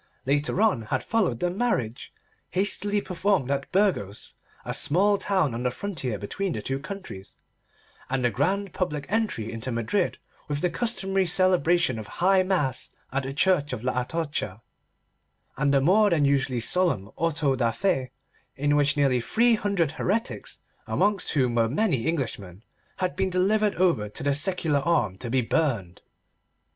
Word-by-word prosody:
Later 145 +6 +1
on 200 - +2
had - - -1
followed 195 - 0
the 175 - +1
marriage, 180 - -2 0.4
hastily 205 +2 +1
performed 180 -7 0
at 140 0 -2
Burgos, 180 - 0 0.3
a - - -3
small 200 +6 +2
town 185 - +1
on 115 - -4
the 125 - +1
frontier 130 - -3
between 175 - -3
the 110 - -4
two 135 +4 -2
countries, 150 - -9 0.7
and 130 -1 0
the 120 - +2
grand 190 - -1
public 150 -6 -2
entry 210 - -1
into 115 +3 -4
Madrid 115 - 0 0.3
with 145 0 -3
the 180 - +1
customary 195 -2 0
celebration 175 -6 +3
of 105 - -8
high 190 +1 +4
mass 175 -9 0 0.2
at 135 +1 0
the 135 0 -5
Church 150 -4 +2
of 115 -2 -5
La 125 0 0
Atocha, 145 - -3 0.9
and 140 0 +1
a - - +5
more 205 +8 +4
than 160 -5 +2
usually 135 -3 +1
solemn 115 - 0
auto 155 -4 +1
da 120 -3 +1
fé, 135 -4 0 0.5
in 145 +1 +1
which 145 0 +2
nearly 135 -4 +2
three 230 - +3
hundred 200 -8 0
heretics, 215 +8 -3 0.3
amongst 205 -2 +1
whom 130 -5 +2
were 115 -1 +2
many 140 - 0
Englishmen, 115 - -3 0.3
had 185 -1 -2
been 190 0 0
delivered 200 +3 +2
over 165 - +1
to 105 - -6
the 140 0 +2
secular 160 -1 +1
arm 135 - +1
to 120 - -5
be 130 +2 +2
burned. 115 - -1
150 Hz, 160 wpm, -26 LUFS, 125-190 Hz, 0.9 s, a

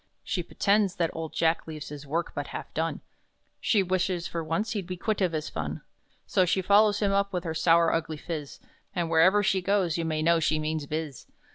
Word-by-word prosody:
She 185 - -2
pretends 200 +2 +1
that 170 -4 0
old 165 -1 -4
Jack 165 0 +1
leaves 155 -2 -7
his 145 0 -9
work 165 +4 -1
but - - -4
half - - -7
done, - - -2 0.6
She 205 -4 +2
'wishes 185 -1 -1
for 165 -1 -4
once 165 +8 -1
he'd 200 -6 -3
be 185 -1 -5
quit 210 +3 -1
of 185 -3 +2
his 155 -2 -3
fun!' 75 -1 -5 0.4
So 185 - +2
she 185 +1 +1
follows 205 +2 +4
him 200 -1 +2
up 200 0 +1
with 180 -2 -2
her 160 - -3
sour, 165 +1 +4
ugly 160 -1 -2
phiz, 150 -2 -6 0.4
And 170 -2 -1
wherever 185 +6 +5
she 190 -1 +2
goes, 180 -3 +1
you - - 0
may 155 -1 -1
know 170 +1 +4
she 155 0 +1
means 155 -1 -2
'biz. 155 -3 -5
170 Hz, 215 wpm, -27 LUFS, 160-190 Hz, 0.6 s, wherever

